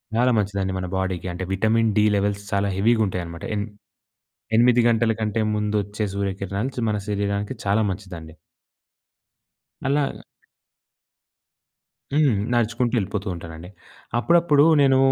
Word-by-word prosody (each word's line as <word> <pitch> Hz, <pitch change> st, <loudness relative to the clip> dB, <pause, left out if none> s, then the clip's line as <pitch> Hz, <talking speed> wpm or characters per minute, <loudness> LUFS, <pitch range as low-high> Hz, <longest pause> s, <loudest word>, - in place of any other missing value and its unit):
చాలా 125 Hz, +2 st, +3 dB
మంచిదండి 100 Hz, -2 st, -1 dB
మన 90 Hz, -1 st, -3 dB
బాడీకి. 95 Hz, -1 st, -2 dB
అంటే 90 Hz, -, -5 dB
విటమిన్ 110 Hz, +3 st, +2 dB
డి 105 Hz, -, +5 dB
లెవెల్స్ 100 Hz, 0 st, -1 dB
చాలా 100 Hz, 0 st, +1 dB
హెవీగుంటయన్నమాట. 95 Hz, -6 st, 0 dB
ఎన్ 100 Hz, -, -1 dB, 0.9 s
ఎనిమిది 120 Hz, +1 st, +5 dB
గంటల 115 Hz, 0 st, +2 dB
కంటే 110 Hz, +1 st, 0 dB
ముందొచ్చే 105 Hz, 0 st, -1 dB
సూర్యకిరణాలు 100 Hz, +4 st, -2 dB
చ -, -, -18 dB
మన 105 Hz, -, 0 dB
శరీరానికి 100 Hz, 0 st, -2 dB
చాలా 100 Hz, +3 st, +2 dB
మంచిదండి. 90 Hz, -5 st, -7 dB, 1.5 s
అలాగ 140 Hz, 0 st, +1 dB, 2.0 s
హ్మ్. 145 Hz, -5 st, +4 dB, 0.2 s
నడుచుకుంటూ 120 Hz, +1 st, 0 dB
వెళ్ళిపోతూ 100 Hz, -1 st, -2 dB
ఉంటానండి. 85 Hz, +1 st, -9 dB, 0.5 s
అప్పుడప్పుడు 165 Hz, +1 st, +4 dB, 0.2 s
నేను 135 Hz, -1 st, +5 dB
105 Hz, 110 wpm, -23 LUFS, 95-115 Hz, 2.0 s, డి